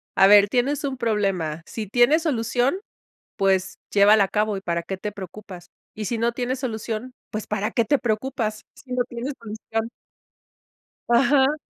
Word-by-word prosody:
"A 195 - +6
ver, 205 0 +7
tienes 260 +6 0
un 275 -2 -2
problema, 195 -9 -1
si 215 -3 -6
tiene 245 - +4
solución, 250 - 0 0.6
pues 190 -1 +1
llévala 205 +1 +6
a 190 - -4
cabo 210 -1 0
y 195 - -5
para 170 -2 -2
qué 190 +3 -5
te 210 +2 -5
preocupas. 190 -2 -10 0.3
Y 215 -1 -5
si 235 - -2
no 235 +1 +1
tiene 250 +2 -2
solución, 235 -1 -4 0.2
¿pues 215 0 -5
para 210 0 -2
qué 235 - +1
te 285 +5 +2
preocupas? 220 -2 -2
Si 255 - -12
no 250 0 +1
tiene 240 +2 -5
solución". 225 0 -4 1.2
Ajá. 270 +4 +4
220 Hz, 165 wpm, -23 LUFS, 205-250 Hz, 1.2 s, ver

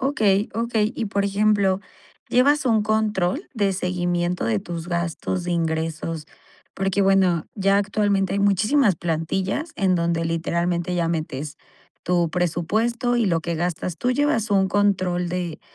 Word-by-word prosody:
Okey, 215 -7 +1
okey. 225 -1 0
Y, 225 - -2
por 200 0 -1
ejemplo, 200 -1 +2 0.5
¿llevas 280 +3 +3
un 220 -3 +3
control 215 - 0
de 200 -4 +1
seguimiento 175 -1 -1
de 115 -2 +1
tus 170 +6 -6
gastos, 175 +1 -2
de 175 - -2
ingresos? 160 -1 -2 0.5
Porque, 195 +1 0
bueno, 190 -4 +3
ya 195 0 +2
actualmente 200 -1 0
hay - - 0
muchísimas 205 +4 +3
plantillas 185 - -2
en 190 -2 +2
donde 170 -1 0
literalmente 170 +1 -1
ya 170 -2 0
metes 155 -3 -4 0.5
tu 175 -1 +1
presupuesto 215 - 0
y 235 - +2
lo 170 -5 +1
que 170 +1 -3
gastas. 170 +1 -2
¿Tú 250 - 0
llevas 290 -5 +1
un 195 -1 +3
control 185 -3 +1
de, 175 -3 -4
185 Hz, 145 wpm, -23 LUFS, 170-210 Hz, 0.5 s, llevas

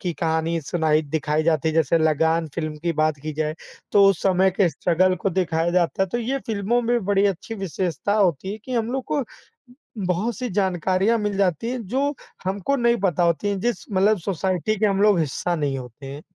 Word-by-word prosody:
की 175 -2 -2
कहानी 160 +1 -1
सुनाई 155 0 +1
दिखाई 150 +1 -1
जाती 160 -1 +1
है। 160 - -2
जैसे 165 +1 +3
लगान 160 +1 +2
फ़िल्म 155 -2 -3
की 170 -1 0
बात 155 -1 +1
की 155 0 -4
जाए, 155 0 -2 0.4
तो 200 -1 +6
उस 190 - -3
समय 190 0 +3
के 185 0 +2
स्ट्रगल 180 +4 +1
को 195 - +2
दिखाया 170 -2 0
जाता 180 +2 +1
है, - - +1
तो 240 - -2
ये 255 +4 -1
फ़िल्मों 220 +2 0
में 240 -2 0
बड़ी 200 +1 +3
अच्छी 200 +3 -3
विशेषता 190 -2 -2
होती 190 -3 +1
है 215 - -7
कि 260 - -6
हम 230 -1 0
लोग 265 -1 -2
को 290 - +1 0.8
बहुत-सी 215 +7 -1
जानकारियाँ 190 +3 +1
मिल 210 -2 -2
जाती 195 +3 0
हैं, 250 -4 -4
जो 280 +5 0 0.3
हमको 195 +8 0
नहीं 235 -2 +3
पता 175 -3 +2
होती 170 +2 +1
हैं, 200 -1 -1
जिस 240 +4 -2
मतलब 200 +3 +3
सोसाइटी 190 +3 -1
के 215 - +3
हम 200 -1 +1
लोग 205 -3 +4
हिस्सा 165 +3 -1
नहीं 145 -4 -1
होते 125 +1 -10
हैं। 140 +2 -7
185 Hz, 205 wpm, -23 LUFS, 160-205 Hz, 0.8 s, तो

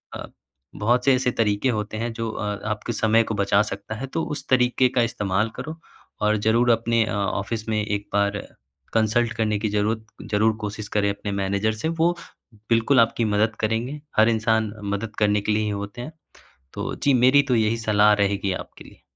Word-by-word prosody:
अ, - - -6 0.5
बहुत 120 +4 +1
से 135 - +5
ऐसे 125 0 0
तरीके 110 +2 +1
होते 110 -2 -2
हैं। 115 +2 -2
जो 115 0 -3
अ, - - -5 0.3
आपके 110 +2 -3
समय 115 0 +3
को - - -1
बचा 100 0 +3
सकता 110 0 -6
है 130 +5 -5
तो 160 +5 -2
उस - - -9
तरीके 125 0 +3
का 125 - +4
इस्तेमाल 105 -2 -1
करो। 160 +1 -6 0.4
और 105 0 +2
ज़रूर 115 +3 +2
अपने 115 0 +2
अ, - - -4
ऑफ़िस 100 +2 -2
में 110 -1 +1
एक 105 -1 -3
बार 100 0 +1 0.6
कंसल्ट 110 +1 +2
करने 105 -2 0
की 110 0 -1
ज़रूरत 105 +2 -1 0.3
ज़रूर 110 +2 +3
कोशिश 105 0 -5
करें 100 -1 +2
अपने 100 +1 -4
मैनेजर 100 +2 0
से। 110 +8 -3
वो 165 +1 +1 0.5
बिल्कुल 115 +3 +3
आपकी 115 0 +1
मदद 105 +1 +1
करेंगे। 115 +7 -2 0.2
हर 110 +1 +6
इंसान 110 -1 +1 0.2
मदद 105 +1 -6
करने 105 -1 +2
के 105 - -1
लिए 110 0 +1
ही 105 - -1
होते 100 +3 -5
हैं। 125 - -7 0.6
तो - - -4
जी 140 - +1
मेरी 140 +3 +6
तो 130 -3 0
यही 110 0 +2
सलाह 105 -2 +4
रहेगी 100 -1 0
आपके - - -8
लिए। - - -17
110 Hz, 195 wpm, -23 LUFS, 105-115 Hz, 0.6 s, हर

